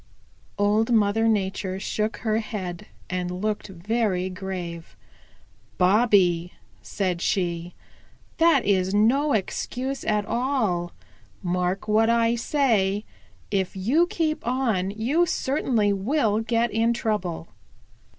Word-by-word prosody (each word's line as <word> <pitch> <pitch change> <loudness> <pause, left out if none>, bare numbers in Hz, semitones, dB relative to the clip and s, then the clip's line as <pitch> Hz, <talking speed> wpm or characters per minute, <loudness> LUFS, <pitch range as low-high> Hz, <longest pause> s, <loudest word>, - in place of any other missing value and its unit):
Old 210 +3 +2
Mother 220 0 +3
Nature 195 -3 -1
shook 215 +2 -2
her 220 -1 0
head 190 -6 -6 0.2
and 180 -1 -2
looked 205 +4 -3
very 190 0 -1
grave. 180 -3 -6 0.8
"Bobby," 185 -3 +3 0.3
said 180 -4 -2
she, 175 -2 -1 0.6
"that 325 -6 +4
is 190 -1 +1
no 270 +8 +3
excuse 255 +6 -2
at 210 -1 0
all. 220 -9 -1 0.5
Mark 180 +2 -1
what 220 +1 +3
I 230 0 +3
say: 225 -6 +1 0.5
If 190 -2 -1
you 260 - +2
keep 315 -5 -2
on 235 -7 0
you 250 - +1
certainly 245 -9 +1
will 215 +1 +1
get 230 +1 0
in 230 +2 +2
trouble. 185 -8 -2
210 Hz, 110 wpm, -25 LUFS, 185-235 Hz, 0.8 s, that